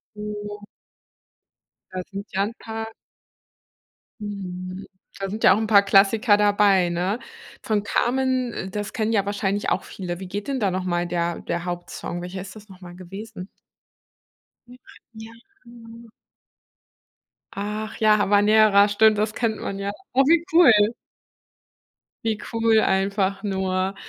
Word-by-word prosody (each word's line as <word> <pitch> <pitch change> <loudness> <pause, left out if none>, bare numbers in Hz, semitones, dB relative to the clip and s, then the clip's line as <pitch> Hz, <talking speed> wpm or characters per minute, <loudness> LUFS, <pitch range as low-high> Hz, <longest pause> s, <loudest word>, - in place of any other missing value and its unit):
Oh. 210 0 -7 1.3
Da 185 0 -4
sind 200 +1 -6
ja 195 - +1
'n 215 +3 -3
paar 225 0 -6 1.3
Mhm. 185 -2 -6 0.3
Da 195 0 -3
sind 215 +3 -5
ja - - +8
auch - - 0
'n 220 - -2
paar 200 -2 +6
Klassiker 205 +2 +4
dabei, 205 -3 +3
ne? 180 +6 -1 0.4
Von 210 -2 -1
Carmen 255 +2 0
äh, 190 - -5
das 205 +1 -5
kennen 220 -1 -1
ja 200 -3 +2
wahrscheinlich 205 0 -1
auch - - 0
viele. 175 -2 -6
Wie 190 - -7
geht 200 +3 -5
denn 275 -2 -2
da 200 -3 +1
noch 185 0 -2
mal 175 -1 0
der 170 0 -2
der 170 +1 -4
Hauptsong? 175 0 -5
Welcher 185 +1 -6
ist 195 - -10
das 215 0 -13
noch 190 -1 -15
mal 175 -1 -11
gewesen? 195 +2 -9 1.2
Ja, 245 - -14 0.4
ja, 220 0 -10 0.3
genau. 235 -1 -14 1.5
Ach, 210 +2 -4
ja, 215 -1 +4
Habanera, 205 0 +5
stimmt, 215 +1 +4
das 215 0 0
kennt 225 -2 -1
man 195 - -4
ja. 200 0 -3 0.2
Oh, 270 +2 +5
wie 335 +3 +4
cool. 330 -6 +8 1.5
Wie 220 -2 0 0.2
cool 225 -1 +3
einfach 195 -1 0
nur. 190 -1 -1
205 Hz, 145 wpm, -23 LUFS, 190-220 Hz, 1.5 s, ja